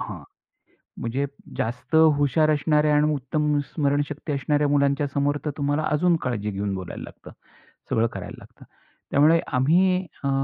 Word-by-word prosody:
...हं. - - -6 0.8
म्हणजे 125 +4 -2 0.3
जास्त 125 +7 -4 0.2
हुशार 145 +2 +2
असणाऱ्या 150 0 +2
आणि 150 +1 +3
उत्तम 150 +2 -1 0.2
स्मरणशक्ती 145 0 -1
असणाऱ्या 145 +2 +1
मुलांच्या 140 0 +2
समोर 145 +1 0
तर 150 - -1
तुम्हाला 145 +1 0
अजून 170 +3 +2
काळजी 105 -5 -2
घेऊन 100 0 -3
बोलायला 95 -2 -7
लागतं. - - -12 0.6
सगळं 115 +1 +2
करायला - - -7
लागतं. - - -16 0.5
त्यामुळे 155 +4 +4 0.2
आम्ही 180 +7 +3 0.2
अ, 140 - +1
145 Hz, 140 wpm, -24 LUFS, 135-150 Hz, 0.8 s, त्यामुळे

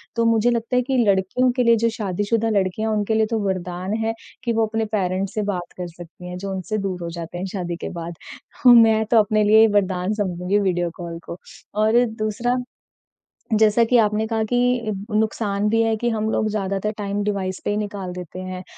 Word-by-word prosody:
तो 230 0 +1
मुझे 230 +1 +3
लगता 235 +2 -1
है 250 - +4
कि 260 +1 -1
लड़कियों 200 +6 +2
के 250 - +3
लिए 235 0 +5
जो 230 - +4
शादीशुदा 210 +2 0
लड़कियाँ 205 +2 0
उनके 215 0 0
लिए 220 0 +3
तो 225 - +1
वरदान 185 +1 -3
है 225 - 0 0.3
कि 235 -2 0
वो 225 0 +2
अपने 225 0 -1
पेरेंट्स 185 0 -1
से 215 - -1
बात 175 -1 -5
कर 180 -1 -4
सकती 175 +1 -11
हैं 180 - -6
जो 195 +1 -5
उनसे 190 +3 -3
दूर 180 -2 -4
हो 170 - -4
जाते 170 +1 -6
हैं 185 - -3
शादी 175 -3 -3
के - - -3
बाद। 170 0 -6 0.5
मैं 225 -2 +7
तो 230 - +5
अपने 215 0 +2
लिए 220 +2 +6
वरदान 185 0 0
समझूँगी 190 -1 0
वीडियो 175 -3 0
कॉल 170 -2 -6
को 170 - -7 0.4
और 235 +3 +4 0.2
दूसरा 240 +4 0 1.0
जैसा 220 +2 +5
कि 245 +2 +3
आपने 215 0 +2
कहा 220 -1 0
कि 245 -2 +1 0.2
नुकसान 210 -1 0
भी 225 +1 +2
है 225 -1 +1
कि 240 +2 0
हम 220 -1 -1
लोग 215 - +1
ज़्यादातर 200 0 -2
टाइम 205 0 -2
डिवाइस 190 -2 -2
पे - - +1
ही 205 - -1
निकाल 200 -3 -4
देते 180 0 -8
हैं। 185 0 -6
210 Hz, 205 wpm, -22 LUFS, 185-225 Hz, 1.0 s, मैं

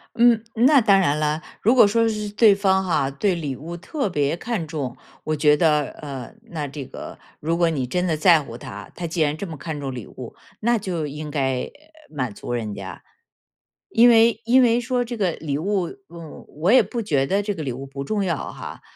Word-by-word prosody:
嗯， 235 -1 +4
那 265 +5 +5
当 200 -4 +4
然 150 -5 +2
了， 150 +1 0 0.2
如 230 - +3
果 240 -5 +7
说 230 +2 +2
是 210 -1 -2
对 210 0 +5
方 190 -1 +2
哈 155 -6 +1
对 160 +8 0
礼 150 -6 -3
物 165 +6 -7
特 215 - -3
别 145 +1 0
看 215 -8 -3
重， 145 -6 -4 0.3
我 155 - -1
觉 150 0 +4
得， 150 -3 +3 0.2
呃， 135 -4 -7 0.2
那 150 -4 -3
这 140 0 -7
个 - - -9 0.2
如 165 +2 -1
果 170 -1 +3
你 130 -5 -2
真 180 +7 -1
的 165 -3 +1
在 165 +1 +5
乎 115 -4 -9
他， 105 -3 -9
他 175 - -4
既 165 +1 -2
然 150 -1 +2
这 195 +5 -6
么 160 -3 -7
看 155 +1 -5
重 135 -2 -4
礼 120 -5 -7
物， - - -10 0.2
那 235 +2 +2
就 180 -7 -3
应 150 +1 -7
该 135 -3 -1 0.4
满 130 -7 -3
足 120 - -6
人 110 -4 -3
家。 95 -3 -8 0.9
因 235 +2 +6
为 230 -1 +5
因 250 +3 +5
为 240 -1 +4
说 245 0 -1
这 240 0 -6
个 190 -5 +1
礼 145 -3 -3
物， 185 +2 -1 0.2
嗯， 170 -2 -11
我 165 +7 0
也 255 - +7
不 235 - -4
觉 145 -10 +1
得 195 +8 +1
这 205 0 -3
个 160 - -5
礼 130 -4 -3
物 135 +2 -7
不 140 0 -6
重 205 +7 -1
要 175 -4 0 0.2
哈。 - - -9
165 Hz, 235 characters per minute, -22 LUFS, 145-210 Hz, 0.9 s, 果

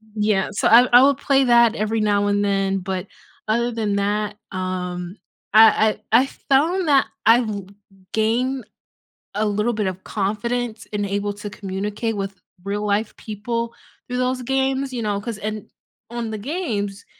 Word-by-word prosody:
yeah, 210 -2 +1
so 205 - 0
I 245 +2 +7
I 245 +2 +9
would 280 -1 +4
play 275 -1 +2
that 235 -2 +5
every 215 +1 -1
now, 205 -1 +2
and 205 0 +1
then, 195 -1 0
but 190 +1 -4 0.4
other 235 +2 +1
than 215 -3 -1
that 210 +1 -1 0.2
um, 180 0 -4 0.4
I 220 0 +6 0.2
I 235 - +8
I - - 0 0.2
found 330 +6 +3
that 275 -2 +4 0.2
I've 230 0 +5
li 200 -2 -5 0.5
gained 240 +3 0 0.7
a 215 +1 +1
little 210 +3 0
bit 210 -2 -1
of 185 0 -5
confidence, 220 +3 -2
and 205 -1 -1
able 200 +1 -2
to 205 0 -7
communicate 205 +3 -4
with 195 0 -4 0.3
real 205 +1 -3
life 205 +1 0
people 230 +2 -4 0.3
through 250 0 -3
those 255 0 0
games, 270 +1 0
you 240 - -3
know, 205 -2 -1
'cause 230 -1 -5
and 215 0 -5 0.4
on 235 -2 -4
the 215 - -4
games 210 - -3
215 Hz, 165 wpm, -22 LUFS, 200-240 Hz, 0.7 s, I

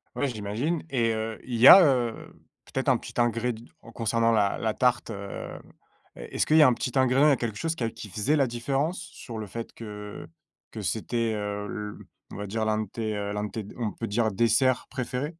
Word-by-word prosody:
Oui, 140 - 0
j'imagine 120 +8 -2
et 115 -4 +1
heu, 110 0 -4
il 120 -2 -4
y 125 +4 +7
a, 190 - +11
heu, 125 -6 0 0.3
peut-être - - -2
un - - +4
petit - - -10
ingréd 120 0 0 0.3
concernant 115 0 +1
la 105 -3 +2
la 110 -2 -1
tarte? 125 -2 +1
Heu, 100 -1 -7 0.6
est-ce - - -3
qu'il 155 - +4
y 155 - +9
a - - +8
un 125 - +4
petit 125 +3 -3
ingrédient, 130 +3 +4
il - - +6
y - - +5
a - - +3
quelque 110 -3 -3
chose 165 +5 -2
què 115 -6 -2
qui 105 - -9
faisait 110 +11 0
la 140 -3 +3
différence 135 +8 -1
sur 170 -10 -9
le 110 - -4
fait 115 +3 -7
que 105 -2 -8 0.4
que 110 - -6
c'était, 115 +3 -1
heu, 105 0 -3
le 105 0 -7 0.3
on - - -7
va 105 - -5
dire 110 +2 -2
l'un 110 0 +1
de 105 - -9
tes, 110 -1 -3
heu, 100 0 -3
l'un 105 0 -2
de 105 - -4
tes 110 -2 -5
on 110 -4 -2
peut 115 - -5
dire 110 +1 +1
dessert 120 +5 +2
préféré? 130 +4 -4
115 Hz, 220 wpm, -27 LUFS, 105-130 Hz, 0.6 s, a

